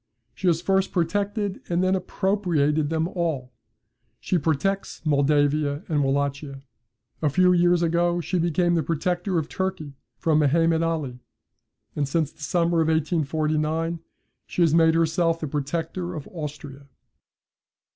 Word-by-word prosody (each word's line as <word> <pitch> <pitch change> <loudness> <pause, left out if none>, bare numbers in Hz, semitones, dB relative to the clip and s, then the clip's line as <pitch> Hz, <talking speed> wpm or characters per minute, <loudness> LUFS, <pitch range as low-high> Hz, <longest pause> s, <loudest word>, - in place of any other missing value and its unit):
She 190 - -3
has 170 0 +2
first 195 0 +1
protected, 200 +3 -1
and 175 +1 +1
then 185 0 +2
appropriated 170 -7 0
them 160 0 0
all. 155 -9 -3 0.7
She 180 - 0
protects 160 +6 -1
Moldavia 145 0 +2
and 150 -3 +1
Wallachia. 140 0 -2 0.6
A 155 - +2
few 180 +5 +4
years 175 0 +3
ago 170 +1 +1
she 180 +1 -1
became 175 +1 +1
the 165 - +2
protector 175 +4 -1
of 155 -2 -1
Turkey 190 -7 -4 0.2
from 155 +3 +2
Mehemet 165 +3 +3
Ali; 155 -7 -2 0.8
and 145 -2 0
since 155 +1 0
the - - -21
summer 170 +2 +1
of 160 - +1
1849 160 +1 0 0.5
she 175 - +1
has 160 -2 +3
made 165 -1 +5
herself 165 0 +1
the 155 - -3
protector 165 +5 -3
of 150 - -7
Austria. 145 -4 -8
165 Hz, 135 wpm, -24 LUFS, 150-175 Hz, 0.8 s, made